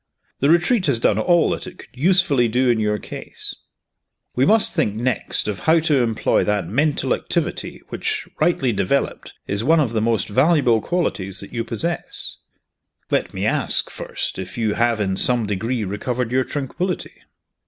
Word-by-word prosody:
The 140 - +2
Retreat 175 +4 +3
has 130 -5 +2
done 110 -2 +2
all 170 +8 +3
that - - -4
it 185 0 -10
could - - -13
usefully 150 -4 +3
do 125 +3 +1
in 120 -2 +2
your 105 -1 0
case. - - -5 0.8
We 130 +3 +3
must 220 0 +5
think 130 - 0
next 120 -1 0
of 100 -3 -3
how 160 - +3
to 155 -4 +2
employ 115 -2 +1
that 105 -1 0
mental 145 +7 +1
activity - - -3
which, - - -3
rightly 135 -8 +2
developed, 100 +8 -1
is 100 +2 -2
one 160 +5 +4
of 130 -7 0
the 110 - +1
most 110 -3 +1
valuable 130 -1 +3
qualities 100 - -2
that 100 - -11
you 115 -1 -1
possess. 165 +11 -2 0.7
Let - - 0
me - - -3
ask, - - 0
first, - - -4
if 95 +3 -7
you 110 -3 0
have 120 0 +1
in 95 -2 -1
some 120 0 +3
degree 110 +4 -2
recovered 115 +5 -3
your 130 0 +2
tranquillity?" 170 +6 -4
120 Hz, 170 wpm, -21 LUFS, 105-155 Hz, 0.8 s, must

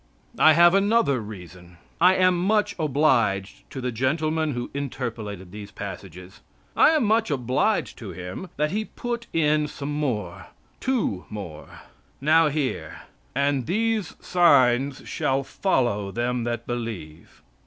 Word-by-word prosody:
I 155 - +7
have 170 +2 +6
another 200 - +3
reason. 90 -4 -11 0.2
I 180 +2 +6
am 185 -1 +4
much 205 +4 +1
obliged 125 -10 +1
to 135 - -7
the 125 -1 -2
gentleman 155 +5 0
who 120 0 -5
interpolated 115 -9 -5
these 105 0 -9
passages. 95 -2 -9 0.4
I - - +6
am 310 -4 +2
much 220 0 +2
obliged 135 - 0
to 110 - -7
him 90 - -7
that 150 +1 0
he 215 +3 -1
put 235 0 -5
in 150 -2 +2
some 145 0 -5
more 105 - -3 0.3
two, 235 - -1
more. 90 -8 -9 0.4
Now 155 +3 +4
hear: 145 -3 -3 0.3
"And 140 -2 0
these 220 0 0
signs 135 -6 +3
shall 135 +1 0
follow 120 - 0
them 120 +2 -1
that 120 -1 -3
believe." 110 -10 -7
135 Hz, 130 wpm, -24 LUFS, 105-165 Hz, 0.4 s, I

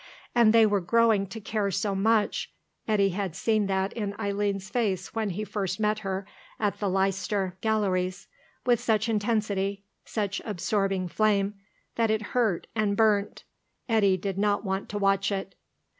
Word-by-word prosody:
And 235 -3 +5
they 225 0 +6
were 205 -2 +2
growing 215 +2 +3
to 225 +4 -7
care 210 -1 -1
so 195 +2 -1
much 210 +2 +1 0.4
Eddy 205 -3 +3
had 190 -2 -3
seen 215 0 +1
that 190 0 0
in 205 -3 -4
Eileen's 200 -1 -1
face 195 -5 -1
when 220 -2 -1 0.2
first 195 -3 -2
he - - -7
met 210 0 +1
her 195 -2 -3 0.3
at 205 -2 -1
the 205 - 0
Leicester 195 0 0
Galleries 190 -4 0 0.4
with 240 -2 +4
such 220 0 +1
intensity, 205 -3 0 0.2
such 205 -2 -2
absorbing 195 -2 -1
flame, 205 +1 +1 0.4
that 230 -1 +2
it 220 0 +1
hurt 225 -8 +1
and 210 -2 0
burnt.... 210 -2 +2 0.4
Eddy 205 -5 +3
did 195 +1 -3
not 205 +1 +1
want 190 0 -2
to 205 - -3
watch 195 0 +2
it. 195 -1 -3
205 Hz, 160 wpm, -27 LUFS, 195-215 Hz, 0.4 s, they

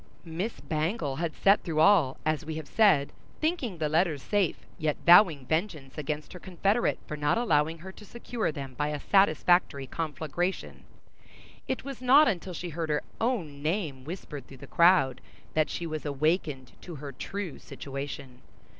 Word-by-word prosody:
Miss 175 +8 -4
Bangle 155 - -2
had 165 -2 -2
sat 200 +1 +4
through 160 -4 -2
all, 160 -7 +5
as 155 0 0
we 160 0 -5
have 155 -2 -6
said, 190 -10 +3 0.3
thinking 310 - -1
the 155 -1 0
letters 155 -2 +1
safe, 205 -5 0
yet 155 -2 0
vowing 170 -6 +7
vengeance 160 -4 -2
against 150 0 -4
her 180 - -9
confederate 195 +6 0
for 150 - -5
not 150 +5 +1
allowing 160 -8 +1
her 185 +4 -9
to 210 - -14
secure 235 -1 -3
them 135 -3 -7
by 145 +4 -1
a 150 -1 -3
satisfactory 175 -5 +3
conflagration; 160 +5 -3
and - - -22 0.8
it - - -2
was 275 -2 -7
not 275 +4 +6
until 185 -1 -2
she 175 +2 -5
heard 165 0 -4
her 150 -1 0 0.2
own 180 - -1
name 155 -5 -2
whispered 150 -4 -7
through 135 - -12
the - - -11
crowd, 170 -7 +4 0.3
that 155 -1 +2
she 170 - -4
was 155 -2 -4
awakened 145 -2 -1
to 175 - -8
her 145 -1 -7
true 185 +5 -6
situation. 140 -2 -7
160 Hz, 170 wpm, -28 LUFS, 145-190 Hz, 0.8 s, vowing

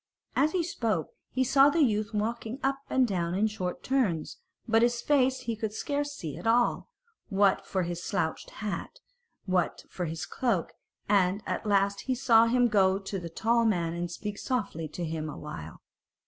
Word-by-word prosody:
As 300 +3 +3
he 360 -2 +1
spoke 225 - -1 0.2
he 260 - +1
saw 275 +2 +6
the 315 +2 +3
youth 210 -4 +1
walking 225 +3 -2
up 270 0 +1
and 260 -1 +3
down 175 -4 -1
in 205 +3 +2
short 190 -5 -3
turns; 220 - 0 0.3
but 225 0 +4
his 240 0 +2
face 260 -1 +2
he 235 -3 -3
could 220 -1 -3
scarce 285 +5 -2
see 160 - -6
at 175 - -5
all, 240 - +2 0.4
what 195 -1 +2
for 190 -2 0
his 175 0 -4
slouched 170 -6 -2 0.2
hat, 210 - -4 0.5
what 185 -3 0
for 180 - -3
his 160 0 -4
cloak; 250 -2 -1 0.3
and 195 0 +2
at - - -3
last 200 0 +2
he 260 - +1
saw 230 -3 +5
him 245 +1 +4
go 195 -4 +4
up 195 0 -6
to 195 0 -3
the 170 -1 -6
tall 230 +7 +2
man 175 -7 +1
and 175 0 -3
speak 205 +4 -5
softly 205 - -2
to 170 +3 -5
him 155 -1 -3
awhile. 80 - -8
210 Hz, 185 wpm, -29 LUFS, 180-245 Hz, 0.5 s, saw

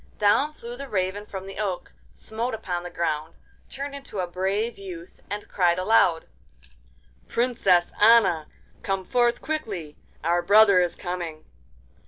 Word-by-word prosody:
Down 210 +9 +3
flew 240 -5 -7
the 275 +2 -8
Raven 200 +1 -2
from 190 -1 -7
the 195 - -8
oak, 195 -4 -3 0.2
smote 225 - -3
upon 180 -5 -3
the 175 - -7
ground, 160 -2 -2 0.3
turned 280 +1 -5
into 275 -6 -8
a 185 - 0
brave 195 +6 -2
youth, 180 -3 -9
and 205 +1 -5
cried 175 -2 +2
aloud: 185 -4 +3 1.0
'Princess 215 -8 +2
Anna, 205 -8 +5 0.3
come 195 -1 -2
forth 240 +3 +1
quickly! 200 - -4 0.3
our 170 +2 +2
brother 200 +1 +6
is 175 -1 +1
coming. 175 -4 -5
195 Hz, 140 wpm, -25 LUFS, 175-225 Hz, 1.0 s, brother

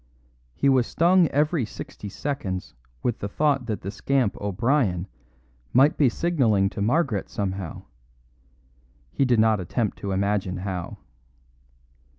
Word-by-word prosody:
He - - +1
was 130 -3 +4
stung 175 +1 +4
every 150 +1 +1
sixty 105 -1 -8
seconds 100 -6 -4 0.3
with 120 - -1
the 100 - -3
thought 140 +1 +1
that 110 -3 -3
the 100 - -5
scamp 130 0 0
O'Brien 100 -2 0 0.7
might 140 +5 +5
be 140 -4 +4
signalling 115 - +1
to 110 - -5
Margaret 120 - +1
somehow; 95 -4 -4 1.3
he 135 - +1
did 120 -3 +3
not 110 -1 +4
attempt 105 +4 -2
to 100 - -4
imagine 95 -1 0
how. 90 -2 -5
110 Hz, 130 wpm, -25 LUFS, 100-140 Hz, 1.3 s, might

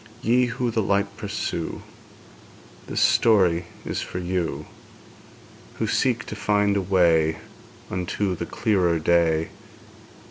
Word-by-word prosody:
Ye 125 +2 +3
who 125 0 -2
the 110 - 0
light 100 0 0
pursue, 100 -6 -4 1.0
This - - -2
story 95 -7 +4 0.2
is - - -3
for - - -6
you, 90 -1 -2 1.1
Who 110 - -2
seek 120 +2 0
to - - -7
find 105 -1 +1
a 100 - +1
way 85 -4 +3 0.5
Unto 90 +2 -2
the - - -5
clearer 90 -6 +1
day. 80 -1 +2
100 Hz, 115 wpm, -24 LUFS, 85-105 Hz, 1.1 s, story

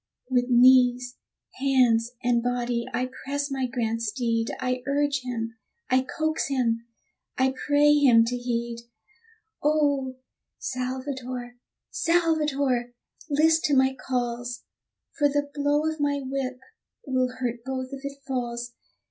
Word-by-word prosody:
With 250 0 +2
knees, 250 0 +5 0.4
hands, 245 -4 +3
and 240 -1 +2
body 245 -1 -1
I 255 - -1 0.2
press 285 +1 -2
my 265 -1 -1
grand 230 -2 -2
steed 230 0 -1
I 255 -1 -1
urge 285 -1 +1
him, 230 -2 -4 0.3
I 255 0 +5
coax 315 +4 -1
him, 235 -4 0 0.5
I 260 0 +2
pray 295 0 +5
him 255 -6 +6
to 245 +2 -2
heed! 235 -1 -3 0.8
Oh, 285 -3 +1 0.4
Salvator! 255 -1 -4 0.3
Salvator! 295 -7 +1 0.3
list 315 +2 +3
to 290 - +3
my 265 0 +4
calls, 245 -2 -3 0.6
For 290 -1 +4
the 285 0 -1
blow 290 +1 +1
of 315 0 -2
my 285 -1 +1
whip 260 -1 -3 0.5
will 255 -2 0
hurt 240 -2 -3
both 260 0 -4
if 275 0 -7
it 280 0 -7
falls. 240 -2 -3
255 Hz, 125 wpm, -26 LUFS, 245-280 Hz, 0.8 s, him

